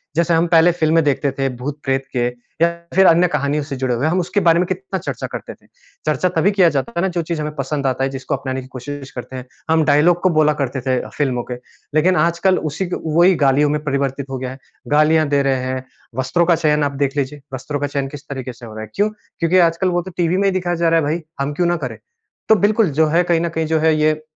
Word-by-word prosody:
जैसे 170 Hz, +1 st, +2 dB
हम 165 Hz, +1 st, +3 dB
पहले 165 Hz, +1 st, +5 dB
फ़िल्में 165 Hz, -1 st, +2 dB
देखते 140 Hz, -1 st, +1 dB
थे 135 Hz, -, +1 dB
भूत 140 Hz, +4 st, -5 dB
प्रेत 135 Hz, 0 st, -1 dB
के 120 Hz, -1 st, +1 dB, 0.4 s
या 170 Hz, -, +6 dB, 0.3 s
फ़िर 190 Hz, 0 st, +6 dB
अन्य 170 Hz, +2 st, +5 dB
कहानियों 150 Hz, -1 st, -1 dB
से 140 Hz, -1 st, -6 dB
जुड़े 130 Hz, -1 st, 0 dB
हुए। 130 Hz, +6 st, 0 dB
हम 175 Hz, +4 st, +1 dB
उसके 180 Hz, +3 st, 0 dB
बारे 165 Hz, 0 st, +5 dB
में 180 Hz, -, +2 dB
कितना 190 Hz, +1 st, -3 dB
चर्चा -, -, -5 dB
करते -, -, -6 dB
थे। -, -, -25 dB, 0.4 s
चर्चा 185 Hz, -, +1 dB
तभी 190 Hz, +6 st, +3 dB
किया 190 Hz, -4 st, +4 dB
जाता 135 Hz, -1 st, -1 dB
है -, -, +2 dB
ना 190 Hz, -, +2 dB
जो -, -, +2 dB
चीज़ 165 Hz, -1 st, -3 dB
हमें 150 Hz, 0 st, -4 dB
पसंद 140 Hz, 0 st, -2 dB
आता 130 Hz, 0 st, 0 dB
है 135 Hz, -, +1 dB
जिसको 135 Hz, +1 st, -3 dB
अपनाने 130 Hz, -1 st, -4 dB
की 130 Hz, -, -12 dB
कोशिश 135 Hz, +2 st, -8 dB
करते 130 Hz, -1 st, -8 dB
हैं। 125 Hz, -1 st, -6 dB, 0.2 s
हम 160 Hz, 0 st, +4 dB
डायलॉग 160 Hz, +4 st, +4 dB
को 185 Hz, -, +4 dB
बोला 150 Hz, -1 st, +4 dB
करते 130 Hz, 0 st, -3 dB
थे 130 Hz, 0 st, 0 dB, 0.2 s
फ़िल्मों 130 Hz, -4 st, 0 dB
के। -, -, -2 dB, 0.4 s
लेकिन 180 Hz, +4 st, +4 dB
आजकल 170 Hz, +3 st, +2 dB
उसी 170 Hz, +7 st, -3 dB
ग -, -, -3 dB
वहीं 170 Hz, +4 st, +4 dB
गालियों 145 Hz, +1 st, +3 dB
में 150 Hz, +1 st, -1 dB
परिवर्तित 140 Hz, -1 st, -2 dB
हो 135 Hz, -, -3 dB
गया 125 Hz, 0 st, -5 dB
है। 130 Hz, -, -9 dB, 0.3 s
गालियाँ 155 Hz, +1 st, +4 dB
दे 140 Hz, -1 st, +2 dB
रहे 135 Hz, -2 st, 0 dB
हैं। 130 Hz, 0 st, -3 dB, 0.3 s
वस्त्रों 130 Hz, +7 st, +1 dB
का 170 Hz, 0 st, +4 dB
चयन 150 Hz, -2 st, +1 dB
आप 145 Hz, -, 0 dB
देख 140 Hz, +1 st, -2 dB
लीजिए, 145 Hz, +1 st, -2 dB
वस्त्रों 145 Hz, +3 st, -4 dB
का 145 Hz, -, -1 dB
चयन 140 Hz, -1 st, -2 dB
किस 145 Hz, 0 st, -9 dB
तरीके 130 Hz, -2 st, -5 dB
से 120 Hz, 0 st, -13 dB
हो 110 Hz, -, -10 dB
रहा 110 Hz, -, -7 dB
है। 110 Hz, -, -10 dB
क्यों? 205 Hz, +2 st, +2 dB, 0.3 s
क्योंकि 170 Hz, +2 st, +2 dB
आजकल 170 Hz, +3 st, -1 dB
वो 175 Hz, 0 st, 0 dB
तो 185 Hz, +2 st, -9 dB
टीवी 175 Hz, +1 st, +1 dB
में 200 Hz, -, +1 dB
ही -, -, +3 dB
दिखाया 180 Hz, -2 st, -1 dB
जा 170 Hz, 0 st, +2 dB
रहा 165 Hz, 0 st, +4 dB
है 150 Hz, -, -1 dB
भई। -, -, -10 dB, 0.2 s
हम 140 Hz, +1 st, -1 dB
क्यों 175 Hz, +4 st, +1 dB
ना 175 Hz, -, +2 dB
करें? -, -, -6 dB, 0.5 s
तो 220 Hz, -, +7 dB
बिल्कुल 210 Hz, -1 st, +2 dB
जो 160 Hz, -, +5 dB
है 165 Hz, +3 st, +3 dB
कहीं 170 Hz, -2 st, +1 dB
न 170 Hz, -, -1 dB
कहीं 160 Hz, 0 st, -2 dB
जो 160 Hz, 0 st, +1 dB
है 160 Hz, 0 st, +3 dB
ये 155 Hz, 0 st, +1 dB
150 Hz, 265 wpm, -19 LUFS, 135-170 Hz, 0.5 s, तो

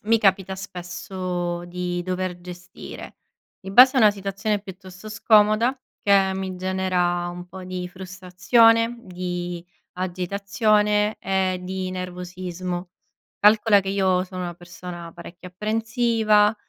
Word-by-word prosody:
mi 225 Hz, +1 st, +3 dB
capita 195 Hz, -2 st, +2 dB
spesso 180 Hz, -1 st, -5 dB
di 175 Hz, 0 st, -3 dB
dover 185 Hz, 0 st, -3 dB
gestire 180 Hz, 0 st, -10 dB, 0.5 s
in 190 Hz, +1 st, -7 dB
base 255 Hz, +4 st, +8 dB
a -, -, +5 dB
una 215 Hz, -2 st, +7 dB
situazione 200 Hz, +1 st, -2 dB
piuttosto 190 Hz, 0 st, -11 dB
scomoda 215 Hz, +3 st, +3 dB, 0.2 s
che 195 Hz, -1 st, +4 dB
mi 190 Hz, -1 st, -4 dB
genera 180 Hz, -1 st, 0 dB
un 175 Hz, 0 st, -8 dB
po' 185 Hz, +1 st, -10 dB
di 180 Hz, -1 st, -5 dB
frustrazione, 195 Hz, +6 st, +2 dB
di 180 Hz, -3 st, -5 dB, 0.3 s
agitazione 200 Hz, +3 st, 0 dB
e 190 Hz, -1 st, 0 dB
di 185 Hz, 0 st, -4 dB
nervosismo. 180 Hz, 0 st, -5 dB, 0.5 s
Calcola 210 Hz, 0 st, +5 dB
che 190 Hz, -, -6 dB
io 190 Hz, -2 st, +2 dB
sono 185 Hz, -1 st, -7 dB
una 175 Hz, -1 st, -5 dB
persona 175 Hz, 0 st, -9 dB
parecchio 175 Hz, +1 st, -11 dB
apprensiva, 220 Hz, +1 st, +2 dB
185 Hz, 120 wpm, -23 LUFS, 180-210 Hz, 0.5 s, base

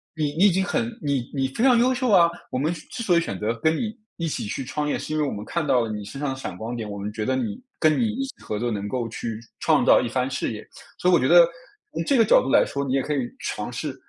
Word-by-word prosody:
你 155 Hz, -, 0 dB
你 195 Hz, -, +5 dB
已 205 Hz, -, +6 dB
经 190 Hz, +2 st, +1 dB
很 240 Hz, +3 st, 0 dB, 0.2 s
你 140 Hz, -4 st, -2 dB
你 135 Hz, -1 st, 0 dB
非 135 Hz, -, -3 dB
常 250 Hz, -3 st, +6 dB
优 255 Hz, +2 st, +3 dB
秀 250 Hz, -1 st, -1 dB
啊， 170 Hz, -3 st, +6 dB, 0.2 s
我 -, -, -1 dB
们 155 Hz, +5 st, 0 dB
之 160 Hz, -, -9 dB
之 235 Hz, -, -5 dB
所 175 Hz, -5 st, +3 dB
以 -, -, +4 dB
选 100 Hz, -, -4 dB
择， 110 Hz, +2 st, -1 dB
跟 160 Hz, +1 st, +3 dB
你 220 Hz, +4 st, -3 dB, 0.2 s
一 170 Hz, -1 st, -2 dB
起 145 Hz, -, -3 dB
去 130 Hz, +5 st, -4 dB
创 150 Hz, +3 st, -2 dB
业， -, -, -1 dB
是 -, -, -5 dB
因 155 Hz, -, 0 dB
为 -, -, +2 dB
我 140 Hz, -, -2 dB
们 105 Hz, +1 st, -6 dB
看 170 Hz, -3 st, -2 dB
到 125 Hz, -4 st, +3 dB
了 115 Hz, -, -2 dB
你 105 Hz, -1 st, -5 dB
身 105 Hz, +7 st, -8 dB
上 145 Hz, -1 st, -1 dB
的 -, -, -4 dB
闪 130 Hz, -9 st, -6 dB
光 115 Hz, +4 st, -5 dB
点。 110 Hz, -3 st, -5 dB
我 100 Hz, -, -6 dB
们 100 Hz, +1 st, -4 dB
觉 110 Hz, -1 st, -3 dB
得 130 Hz, +2 st, +1 dB
你 110 Hz, -5 st, -3 dB, 0.2 s
跟 155 Hz, -1 st, +4 dB
你 235 Hz, -, +2 dB
一 260 Hz, +5 st, -2 dB
起 265 Hz, -, -8 dB
合 105 Hz, -1 st, -3 dB
作 120 Hz, -, -1 dB
能 100 Hz, -3 st, -3 dB
够 120 Hz, 0 st, -2 dB
去 115 Hz, -1 st, -5 dB, 0.2 s
创 -, -, +3 dB
造 -, -, +6 dB
一 120 Hz, -, -2 dB
番 130 Hz, +1 st, -1 dB
事 130 Hz, -, -2 dB
业。” 105 Hz, -, -8 dB, 0.3 s
所 180 Hz, -, +2 dB
以 -, -, +4 dB
我 175 Hz, -, +7 dB
觉 -, -, 0 dB
得， 170 Hz, 0 st, +8 dB, 0.5 s
从 -, -, -2 dB
这 275 Hz, -, +3 dB
个 225 Hz, -, +5 dB
角 -, -, +5 dB
度 135 Hz, -, -3 dB
来 -, -, +5 dB
说， 140 Hz, 0 st, -3 dB
你 130 Hz, -, -2 dB
也 135 Hz, -, +2 dB
可 150 Hz, -, -2 dB
以 145 Hz, -, 0 dB, 0.2 s
尝 -, -, -4 dB
试， -, -, -4 dB
140 Hz, 340 characters per minute, -24 LUFS, 115-175 Hz, 0.5 s, 得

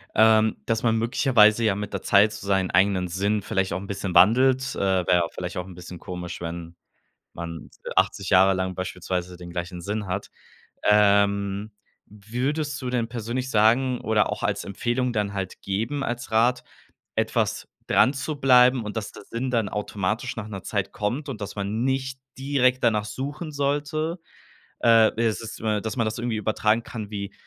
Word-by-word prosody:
ähm, 110 Hz, 0 st, +5 dB
dass 115 Hz, -1 st, -1 dB
man 115 Hz, -1 st, +3 dB
möglicherweise 115 Hz, -1 st, +4 dB
ja 105 Hz, -3 st, +2 dB
mit 105 Hz, 0 st, -5 dB
der 100 Hz, -, -3 dB
Zeit 105 Hz, +2 st, +4 dB
so 105 Hz, -1 st, -8 dB
seinen 95 Hz, -2 st, +1 dB
eigenen 95 Hz, 0 st, +3 dB
Sinn 100 Hz, +4 st, 0 dB
vielleicht 95 Hz, -3 st, -1 dB
auch 95 Hz, -, -2 dB
'n 100 Hz, -, -9 dB
bisschen 95 Hz, -2 st, -4 dB
wandelt. 130 Hz, +8 st, +4 dB
Äh, -, -, -5 dB
wäre 95 Hz, -2 st, +1 dB
ja 90 Hz, -1 st, +4 dB
vielleicht 90 Hz, 0 st, -6 dB
auch 90 Hz, 0 st, -4 dB
'n 95 Hz, -, -11 dB
bisschen 90 Hz, -1 st, -10 dB
komisch, 90 Hz, -2 st, -7 dB
wenn 85 Hz, 0 st, -6 dB, 0.6 s
man 85 Hz, -2 st, -7 dB, 0.3 s
80 100 Hz, -, +1 dB
Jahre 95 Hz, 0 st, +6 dB
lang 95 Hz, 0 st, -2 dB
beispielsweise 90 Hz, -1 st, -4 dB
den 90 Hz, 0 st, -10 dB
gleichen 90 Hz, +1 st, -5 dB
Sinn 105 Hz, +3 st, -3 dB
hat. 95 Hz, +2 st, -4 dB, 0.5 s
Ähm, 100 Hz, 0 st, +3 dB, 0.4 s
wie 105 Hz, +4 st, -7 dB
würdest 145 Hz, 0 st, -1 dB
du 125 Hz, -, -3 dB
denn 120 Hz, -2 st, -1 dB
persönlich 120 Hz, +2 st, -4 dB
sagen 120 Hz, +3 st, +3 dB
oder 110 Hz, -2 st, +1 dB
auch 105 Hz, -, -5 dB
als 100 Hz, 0 st, -1 dB
Empfehlung 120 Hz, +5 st, -1 dB
dann 105 Hz, -2 st, -1 dB
halt 95 Hz, -2 st, -5 dB
geben, 115 Hz, +9 st, -2 dB
als 120 Hz, -2 st, -4 dB
Rat, 120 Hz, +3 st, +2 dB, 0.5 s
etwas -, -, 0 dB, 0.2 s
dranzubleiben 130 Hz, -3 st, +4 dB
und 105 Hz, +1 st, -5 dB
dass 105 Hz, -, -4 dB
der -, -, -12 dB
Sinn 125 Hz, +2 st, -3 dB
dann 115 Hz, -4 st, +1 dB
automatisch 105 Hz, +3 st, -2 dB
nach 110 Hz, -2 st, -5 dB
'ner 95 Hz, -3 st, -7 dB
Zeit 100 Hz, -3 st, -2 dB
kommt 120 Hz, +9 st, -3 dB
und 115 Hz, -6 st, -6 dB
dass 100 Hz, -1 st, -5 dB
man 105 Hz, +3 st, -2 dB
nicht 130 Hz, 0 st, -1 dB, 0.2 s
direkt 130 Hz, -2 st, +1 dB
danach 105 Hz, -3 st, +2 dB
suchen 145 Hz, +8 st, -5 dB
sollte? 145 Hz, +4 st, -1 dB, 0.6 s
Äh, 115 Hz, -1 st, +6 dB
es 115 Hz, -1 st, 0 dB
ist, 115 Hz, -1 st, -8 dB
äh 110 Hz, -1 st, 0 dB
dass 110 Hz, +4 st, -4 dB
man 115 Hz, -, +1 dB
das 110 Hz, +2 st, -3 dB
irgendwie 120 Hz, -1 st, -2 dB
übertragen 110 Hz, +1 st, +1 dB
kann 110 Hz, -2 st, -7 dB
wie, 100 Hz, -1 st, -5 dB
105 Hz, 180 wpm, -25 LUFS, 95-125 Hz, 0.6 s, Jahre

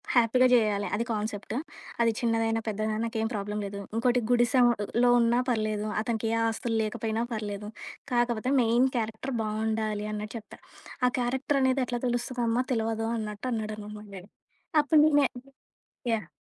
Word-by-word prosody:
హ్యాపీగా 245 Hz, +2 st, +5 dB
జేయాలే 210 Hz, -4 st, +3 dB
అది 230 Hz, -, -1 dB
కాన్సెప్టు. 215 Hz, 0 st, -3 dB, 0.5 s
అది 230 Hz, -1 st, +4 dB
చిన్నదైనా, 225 Hz, -1 st, +1 dB
పెద్దదైనా 215 Hz, 0 st, -1 dB
నాకేం 225 Hz, -1 st, -1 dB
ప్రాబ్లమ్ 210 Hz, 0 st, -3 dB
లేదు. 200 Hz, 0 st, -6 dB, 0.2 s
ఇంకోటి 245 Hz, +2 st, +3 dB
గుడిసెలో 240 Hz, -1 st, +3 dB
ఉన్నా 235 Hz, +1 st, +3 dB
పర్లేదు, 215 Hz, -2 st, 0 dB
అతనికే 225 Hz, 0 st, -1 dB, 0.2 s
ఆస్తులు 225 Hz, +1 st, -1 dB
లేకపోయినా 220 Hz, +1 st, -2 dB
పర్లేదు. 210 Hz, -1 st, -4 dB, 0.4 s
కాకపోతే 240 Hz, 0 st, +1 dB
మెయిన్ 240 Hz, +2 st, +4 dB
క్యారెక్టర్ 225 Hz, +4 st, -3 dB
బావుండాలి" 215 Hz, -1 st, -1 dB
అన్నట్టు 210 Hz, +2 st, -5 dB
చెప్పా. 220 Hz, -, -12 dB, 0.5 s
"ఆ -, -, +4 dB
క్యారెక్టరనేది 265 Hz, +1 st, +1 dB
ఎట్లా 240 Hz, 0 st, -3 dB
తెలుస్తదమ్మా 240 Hz, 0 st, 0 dB
తెలవదు" 225 Hz, -1 st, -1 dB
అన్నట్టు 210 Hz, 0 st, -5 dB
అన్నాడు 215 Hz, -2 st, -2 dB, 0.2 s
మా 210 Hz, -, -10 dB
డాడీ. 190 Hz, +1 st, -10 dB, 0.5 s
అప్పుడు 295 Hz, +1 st, +5 dB, 0.2 s
నే 285 Hz, -, +4 dB, 0.9 s
యాహ్! 215 Hz, -6 st, -3 dB
225 Hz, 130 wpm, -28 LUFS, 215-240 Hz, 0.9 s, హ్యాపీగా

